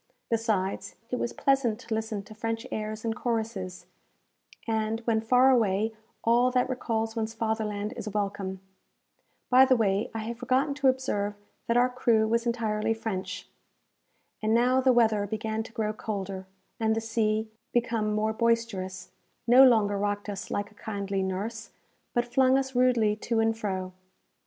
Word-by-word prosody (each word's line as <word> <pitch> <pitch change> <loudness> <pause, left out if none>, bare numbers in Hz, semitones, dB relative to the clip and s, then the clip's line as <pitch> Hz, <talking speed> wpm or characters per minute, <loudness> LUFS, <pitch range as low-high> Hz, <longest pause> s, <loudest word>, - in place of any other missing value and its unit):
Besides, 220 -4 -1 0.2
it 250 - -1
was 235 - -1
pleasant 270 -5 +1
to 235 -2 -5
listen 220 -2 -2
to 215 - -12
French 225 +1 -3
airs 215 +1 -4
and 225 -1 -1
choruses; 220 -7 -3 0.8
and, 220 0 0
when 225 -1 +1
far 250 +3 +5
away, 220 -2 +2 0.3
all 240 +2 +4
that 250 0 +1
recalls 225 -3 -2
one's 225 0 -3
fatherland 220 -2 -2
is 215 - -5
welcome. 195 -2 -3 0.9
By 255 +1 +8
the 260 -1 +4
way, 205 -3 +1
I 220 - -2
have 230 +1 -5
forgotten 260 +3 +1
to 280 -1 +1
observe 210 -6 0 0.3
that 235 - +2
our 245 +1 +5
crew 235 -3 +2
was 235 +2 +1
entirely 225 -2 0
French. 190 -4 -4 0.9
And 215 +1 +2
now 250 +2 +4
the 260 0 +4
weather 220 -4 +3
began 220 +1 -2
to 225 - -9
grow 215 -1 -2
colder, 195 -3 -5 0.3
and 220 -1 +2
the - - 0
sea, 220 -1 0 0.2
become 230 -3 0
more 215 +1 0
boisterous, 220 -6 -1 0.3
no 250 +3 +8
longer 215 -6 +4
rocked 205 0 -2
us 200 -2 -5
like 205 +1 -3
a - - -19
kindly 200 -2 -3
nurse, 205 +4 -3 0.5
but 240 0 +2
flung 260 +2 +3
us 265 0 -2
rudely 245 -4 +3
to 230 +1 -1
and 225 0 +2
fro. 190 -4 -3
220 Hz, 160 wpm, -28 LUFS, 210-235 Hz, 0.9 s, By